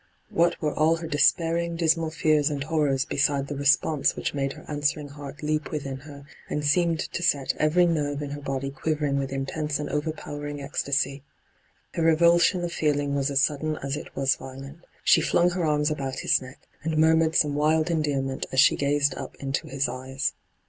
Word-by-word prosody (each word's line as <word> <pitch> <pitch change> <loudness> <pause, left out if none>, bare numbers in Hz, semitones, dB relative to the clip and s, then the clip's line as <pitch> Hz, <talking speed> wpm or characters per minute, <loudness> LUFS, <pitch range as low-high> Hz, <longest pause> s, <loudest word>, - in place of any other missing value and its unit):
What 170 +1 +2
were 150 -2 -1
all 155 +2 +3
her 165 0 -6
despairing, 165 +3 +2
dismal 165 -1 +1
fears 155 -2 +2
and 145 -2 -3
horrors 145 -3 +1
beside 140 -3 +1
the 145 - -5
response 140 +1 +2
which - - -3
made 135 -1 -2
her - - -13
answering 145 0 -1
heart 145 +1 -10
leap 150 0 -1
within 140 -3 -4
her, 140 0 -12 0.2
and 150 0 -2
seemed 165 +2 +2
to - - -4
set 145 -5 +1
every 160 +4 +3
nerve 150 -3 -1
in 140 - -5
her 145 0 -6
body 135 -1 -3
quivering 145 0 -1
with 135 -1 -3
intense 145 +2 -2
and 150 - -5
over 150 +2 -1
powering 145 -1 -7
ecstasy? 140 0 -1 0.7
Her - - -2
revulsion 170 +2 +4
of 170 -1 -3
feeling 145 -2 0
was 140 0 0
as 140 0 +2
sudden 155 +1 0
as 140 0 -2
it - - -9
was 135 0 +1
violent. 135 +3 -10 0.2
She 165 - +5
flung 175 +2 +2
her 180 0 -2
arms 150 0 +1
about 135 -3 -3
his - - +2
neck, 130 +1 -11 0.2
and 160 0 -2
murmured 160 0 +4
some 150 -2 +3
wild 155 +3 +2
endearment 140 -4 -1
as 130 - +1
she 155 +4 +6
gazed 145 0 +1
up - - -7
into 135 -1 -3
his 135 0 -1
eyes. 130 +2 -3
145 Hz, 190 wpm, -25 LUFS, 140-160 Hz, 0.7 s, she